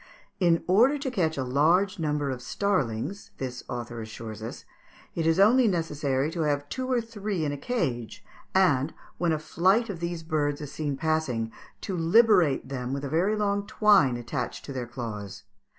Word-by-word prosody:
In 170 -3 +3
order 235 +11 +4
to 275 -2 -3
catch 160 - 0
a 135 - 0
large 170 +9 +2
number 150 -3 0
of 125 -1 -5
starlings, 185 - -1
this 125 -1 -5
author 120 -2 -5
assures 110 -1 -8
us, 110 - -7 0.5
it 165 -1 -1
is 165 +2 +3
only 235 +5 +6
necessary 150 -6 0
to 165 - -3
have 145 -2 0
two 260 0 -3
or 245 -2 +2
three 210 -6 -3
in 145 - -1
a - - -3
cage, 135 - -3 0.3
and, 160 -6 +3 0.2
when 175 -2 +2
a 155 - +1
flight 190 +8 +2
of 175 - -7
these 170 -1 -4
birds 145 -2 -1
is 145 -2 -7
seen 145 -3 -3
passing, 135 -8 -1 0.3
to 190 - -3
liberate 175 - +4
them 130 -1 -4
with 140 +1 -3
a - - -4
very 180 +8 +2
long 205 -1 0
twine 205 - +4
attached 120 +2 -4
to 140 - -6
their 125 -2 -4
claws. 105 -5 -6
155 Hz, 180 wpm, -27 LUFS, 130-195 Hz, 0.5 s, only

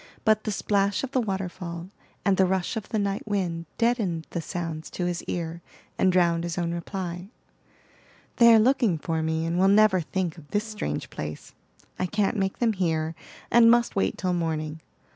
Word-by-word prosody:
But 215 -1 +3
the 215 - -1
splash 200 +1 +1
of 265 - -4
the 260 - +2
waterfall, 180 -4 -4 0.4
and 200 -2 +4
the 190 0 +4
rush 190 +3 -1
of 220 -3 -5
the 220 - -1
night 200 0 -2
wind 175 -5 -2
deadened 215 -9 +1
the 170 - -2
sounds 165 -2 -5
to 180 - -3
his 175 -1 -2
ear, 170 -1 -4 0.3
and 185 - +3
drowned 170 -2 +3
his 170 0 -4
own 170 -1 -1
reply. 180 +1 -5 1.1
"They 235 -1 +8
are 225 - +8
looking 235 -6 +3
for 160 +1 -2
me, 160 0 -1
and 170 +2 -1
will 190 - +5
never 200 -2 +5
think 175 0 -3
of 145 - -16
this 205 +5 0
strange 210 - -4
place. 75 0 -7 0.5
I 185 - 0
can't 210 +1 0
make 195 -2 -1
them 230 -2 +2
hear, 160 -4 0 0.4
and 235 -1 +7
must 235 0 +3
wait 195 - 0
till 185 -2 -1
morning. 160 -2 -2
185 Hz, 185 wpm, -26 LUFS, 170-205 Hz, 1.1 s, They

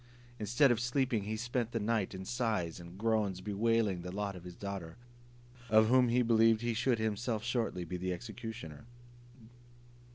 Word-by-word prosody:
Instead 120 +6 +4
of 120 - +2
sleeping, 120 -3 0
he 110 +1 -2
spent 120 0 -2
the 115 - 0
night 105 -2 0
in 95 0 -7
sighs 110 -9 -1
and 85 +1 -11
groans, 105 -3 +1
bewailing 105 -1 +1
the 90 +1 -6
lot 100 0 -3
of 90 -1 -10
his 90 -1 -8
daughter, 95 -5 -6 0.7
of 110 0 +5
whom 125 -1 +5
he 125 +1 +3
believed 115 -1 +4
he 120 0 0
should 120 +2 +1
himself 110 +1 -1
shortly 115 -7 -1
be 90 +2 -4
the 90 +1 -2
executioner. 110 -5 -7
110 Hz, 165 wpm, -33 LUFS, 95-115 Hz, 0.7 s, of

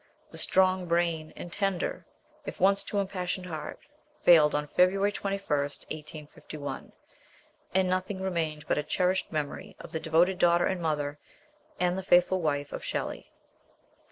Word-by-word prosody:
The - - -5
strong 185 -1 +3
brain, 170 -2 0
and 175 - -8
tender, 195 -3 -1 0.4
if - - -7
once 195 +1 +4
too 205 - -4
impassioned 185 -2 -2
heart, 160 -4 -6 0.5
failed 155 -4 +7
on 150 0 0
February 195 +6 +3
21, 195 -1 -3
1851, 150 0 -5 0.8
and 190 -1 +4
nothing 185 +1 -1
remained 165 -5 -2
but - - +1
a - - -1
cherished 185 +4 0
memory 150 -3 -4
of - - -10
the 160 - -2
devoted 170 +4 +2
daughter 175 0 +4
and 190 -2 -1
mother, 150 -2 -1 0.6
and 180 0 +2
the 190 - -2
faithful 185 0 +4
wife 145 -2 -1
of - - -5
Shelley. - - -4
175 Hz, 145 wpm, -29 LUFS, 155-185 Hz, 0.8 s, failed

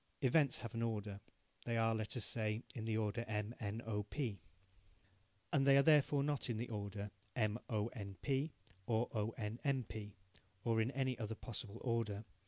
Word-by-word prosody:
Events 140 +1 +4
have 115 - -6
an 115 - -1
order. 105 -3 -1 0.4
They 115 -1 0
are, 115 0 +4
let 110 +2 -2
us 120 - 0
say, 110 0 0
in 110 -3 -4
the 110 -1 +1
order 110 +2 0
M, 105 +1 -1
N, 110 +2 -3
O, 105 -2 0
P. 105 -1 -2 1.1
And 140 - +5
they 140 0 +8
are 140 - +7
therefore 145 -2 +5
not 145 -3 0
in 115 - 0
the 120 +2 -3
order 100 -1 -3 0.2
M, 110 -1 +2
O, 110 0 +1
N, 100 -5 -6
P, 135 +6 +1 0.4
or 115 +1 +2
O, 110 -1 +1
N, 110 +1 -3
M, 140 -3 +2
P, 105 -2 -7 0.5
or 115 -1 +3
in 110 - +2
any 130 -2 0
other 110 0 -2
possible 115 -2 -5
order. 115 -4 0
115 Hz, 190 wpm, -39 LUFS, 105-125 Hz, 1.1 s, they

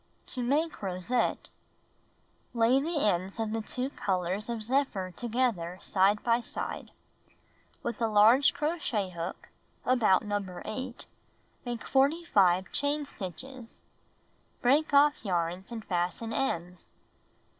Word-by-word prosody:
To 255 - -3
Make 295 +6 0
Rosette 195 +5 -1 1.1
Lay 235 +4 +4
the 310 -2 0
ends 185 +2 -1
of 220 -1 -1
the 225 0 -1
two 255 +5 -4
colors 190 -1 -2
of 230 -2 -3
zephyr 220 -7 0
together 225 -7 -1
side 200 +2 +2
by 235 0 +3
side. - - -5 0.9
With 235 -1 -4
a 230 - +3
large 220 +6 +6
crochet 290 - -1
hook 170 +1 -6 0.4
(about 225 -6 +3
No. 205 -1 -1 0.2
8) 255 +1 -6 0.6
make 240 -2 -4
45 265 - +3
chain 290 +1 0
stitches. 240 - -9 0.8
Break 280 +5 +3
off 290 +1 +4
yarns 180 0 -2
and 225 -2 -6
fasten 180 +6 -2
ends. 180 -9 -3
225 Hz, 115 wpm, -29 LUFS, 190-265 Hz, 1.1 s, large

